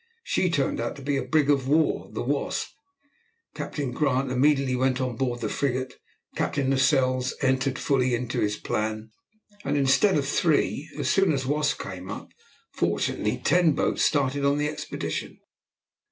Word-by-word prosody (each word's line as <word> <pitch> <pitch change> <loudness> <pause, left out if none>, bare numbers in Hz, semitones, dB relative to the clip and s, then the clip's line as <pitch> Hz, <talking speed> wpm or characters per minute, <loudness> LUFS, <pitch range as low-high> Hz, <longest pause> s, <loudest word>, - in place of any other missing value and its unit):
She 185 - +1
turned 140 -5 0
out 120 - -2
to 140 - -11
be 140 +1 0
a 135 - 0
brig 140 +3 +2
of 140 -3 +2
war, 155 +3 +2
the - - -4
Wasp. - - -1 0.8
Captain 140 -4 -4
Grant 135 -1 0
immediately 135 0 +2
went 130 +1 +1
on 130 -2 -2
board 120 -1 -2
the 110 - -1
frigate. 130 +2 -2 0.4
Captain 135 -2 0
Lascelles 130 -2 +2
entered 135 0 +1
fully 130 -3 +1
into 125 +1 -3
his 105 0 0
plan, 110 0 -3 0.5
and - - 0
instead 140 +7 +4
of 140 -2 -1
three, 150 0 +1
as - - -2
soon 195 -3 +3
as 135 -3 0
the 130 - -4
Wasp 150 -1 +1
came 95 0 -7
up, 105 - -7 0.4
fortunately - - -1
ten 175 -3 +3
boats - - 0
started 140 -1 +1
on 140 +1 +3
the 150 0 0
expedition. 150 0 -5
135 Hz, 165 wpm, -26 LUFS, 125-145 Hz, 0.8 s, instead